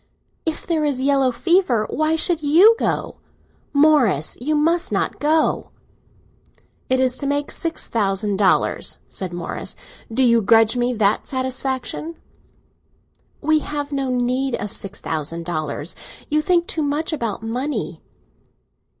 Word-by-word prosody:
"If 320 - -2
there 325 -3 0
is 285 -4 0
yellow 270 -1 +3
fever, 335 - +2
why 310 +2 0
should 330 0 +1
you 345 +10 +6
go? - - -2 0.5
Morris, 280 - +3
you 305 +4 0
must 335 +4 +1
not - - -1
go!" 310 +2 +1 1.2
"It 260 0 +2
is 255 -1 +2
to 280 - 0
make 285 +1 -1
six 330 -1 -2
thousand 200 -2 0
dollars," 195 -2 +1
said 185 -2 -5
Morris. 175 -1 -5 0.4
"Do 260 +4 +2
you 235 -2 +4
grudge 225 +2 +4
me 245 0 +1
that 210 -1 +1
satisfaction?" 260 +4 -3 1.3
"We 310 +1 +3
have 290 -1 -4
no 275 -2 -1
need 250 +1 0
of 205 0 -5
six 195 - -7
thousand 160 +2 -3
dollars. 155 -1 -3 0.4
You 305 +1 +3
think 345 +1 +2
too 320 - -2
much 295 +3 -1
about 230 -7 -3
money!" 250 +6 -3
265 Hz, 135 wpm, -21 LUFS, 225-305 Hz, 1.3 s, you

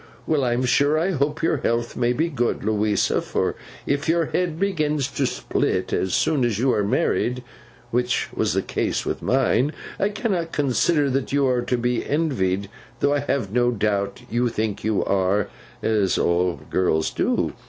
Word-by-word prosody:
Well, 150 -4 +1
I'm 125 +1 +1
sure 145 +4 +3
I 175 +5 +1
hope 150 -1 -1
your 160 - +2
health 120 -2 -1
may 120 0 +1
be 155 +7 +1
good, 130 -7 -1
Louisa; 105 0 +1
for - - -1 0.3
if 145 +2 -1
your 165 0 +3
head 170 0 -1
begins 155 -8 0
to 140 -1 0
split - - -1
as 95 -2 0
soon 150 -5 +2
as 120 -4 +1
you 125 +3 +2
are 105 - +1
married, 125 +4 0 0.5
which 125 +1 0
was - - 0
the - - +1
case - - -1
with - - -3
mine, 135 +2 +2 0.3
I 200 - +2
cannot 195 -6 -2
consider 145 +2 +2
that 135 0 -1
you 140 0 +2
are 125 -2 +2
to 125 +1 -1
be 120 0 0
envied, 100 - 0 0.3
though 145 0 +2
I 145 - +2
have 135 -8 -2
no 120 0 +3
doubt 105 0 -1
you 120 +1 +1
think 110 -2 -3
you 110 -1 +1
are, 100 +1 +1 0.3
as 105 -4 +2
all 85 0 +1
girls 80 -4 +1
do. - - 0
125 Hz, 175 wpm, -23 LUFS, 110-145 Hz, 0.5 s, sure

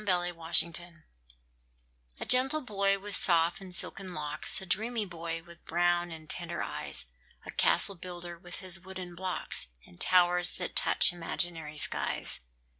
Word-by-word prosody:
THE 180 -3 +1
CASTLE 165 0 +2
BUILDER 170 0 -8 1.1
A - - -5
gentle 265 +5 +6
boy, 200 -5 +1
with 200 0 -2
soft 170 0 +3
and 185 -2 -5
silken 185 +1 +1
locks 150 0 0
A 190 - -8
dreamy 220 +4 0
boy, 165 -2 -6
with 170 0 -15
brown 175 +1 +1
and 160 -1 -9
tender 170 0 -3
eyes, 75 0 -3 0.4
A - - -6
castle 200 - +4
builder, 175 -1 -8
with 175 0 -9
his 185 -1 -4
wooden 185 0 -8
blocks, 185 - -4 0.2
And 85 - -15
towers 180 -1 +4
that 180 - -5
touch - - +5
imaginary 165 -2 -2
skies. - - -1
175 Hz, 150 wpm, -30 LUFS, 170-190 Hz, 1.1 s, gentle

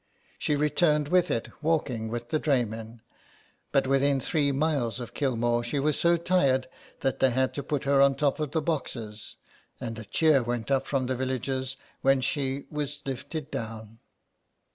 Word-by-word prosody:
She 150 - +1
returned 150 0 +2
with 180 0 +3
it, 115 - -1
walking 145 -8 0
with 120 +1 -5
the 155 - +1
dray 135 -6 +2
men, 110 +1 -8 0.7
but 135 - +3
within 135 +1 +3
three 145 0 +1
miles 140 -5 0
of 120 -1 -7
Kilmore 120 -3 +1
she 120 +5 -2
was 150 +1 +2
so 170 0 +4
tired 140 -7 +2 0.3
that 135 - 0
they 130 - +5
had 130 +1 +1
to 140 - -3
put 145 -1 -2
her 140 0 +4
on 140 0 +6
the - - -13
top 145 -1 +1
of 150 -2 -1
the 160 +1 -1
boxes, 115 -9 -4 0.4
and 115 -3 -5
a 110 - -8
cheer 155 +4 +4
went 120 +1 -3
up 135 0 +2
from 135 -2 0
the 130 +1 -1
villagers 130 +1 -2 0.2
when 135 0 +4
she 135 +1 -1
was 145 -1 -4
lifted 140 +3 -5
down. 110 0 -6
135 Hz, 180 wpm, -28 LUFS, 120-145 Hz, 0.7 s, on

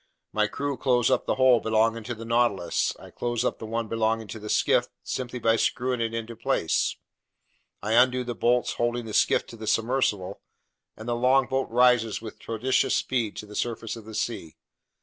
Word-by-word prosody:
My 105 0 +2
crew 140 +4 -3
close 125 -3 +2
up - - +1
the - - +1
hole 130 -2 +5
belonging 115 +1 +1
to 120 - -4
the 115 +1 -9
Nautilus; 115 -7 +1
I - - -13
close 120 0 -2
up - - -1
the 110 - -7
one 115 0 -2
belonging 110 0 0
to 110 - -6
the 105 0 -8
skiff, - - +2 0.2
simply 125 -1 -4
by 115 -1 +2
screwing 125 +1 0
it 115 -1 -1
into 115 0 -5
place. 115 -8 0 0.9
I 105 +2 0
undo 125 +1 +4
the 120 0 -4
bolts 120 +2 +1
holding 120 0 -1
the 110 - -7
skiff - - +3
to - - -11
the 110 0 -8
submersible, 110 -4 0 0.6
and 110 - -9
the 120 - 0
longboat 130 +2 +2
rises 120 -2 +3
with 110 -2 -9
prodigious 115 +4 0
speed 120 -5 -1
to - - -7
the 105 0 -12
surface 115 -1 -3
of 115 -2 -11
the 110 0 -9
sea. 110 -7 -3
115 Hz, 190 wpm, -26 LUFS, 110-125 Hz, 0.9 s, hole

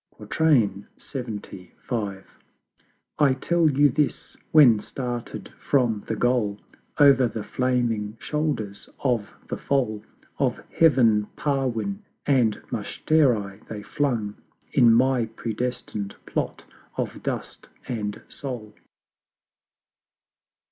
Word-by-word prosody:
LXXV. 110 - -1 1.5
I 145 -3 +5
tell 170 0 +3
you 145 +1 +4
this 145 +2 -1 0.2
When, 130 -9 +7
started 120 +1 -5
from 120 -7 +1
the 110 - -1
Goal, 110 -4 +1 0.4
Over 140 -4 +6
the 110 -1 -5
flaming 115 -4 0
shoulders 150 -10 -2
of 120 -6 +1 0.2
the - - -3
Foal 110 -7 0 0.4
Of - - +1
Heav'n 115 -10 +4
Parwin 135 - -1 0.3
and 125 -7 +3 0.2
Mushtari 115 -11 +1
they 105 -2 -6
flung, 115 -8 -1 0.4
In 120 -1 +6
my 125 0 +3
predestined 110 -2 -4
Plot - - -3 0.3
of - - -3
Dust - - -5 0.2
and 105 -4 -4
Soul. 120 -7 -6
120 Hz, 95 wpm, -25 LUFS, 105-140 Hz, 1.5 s, When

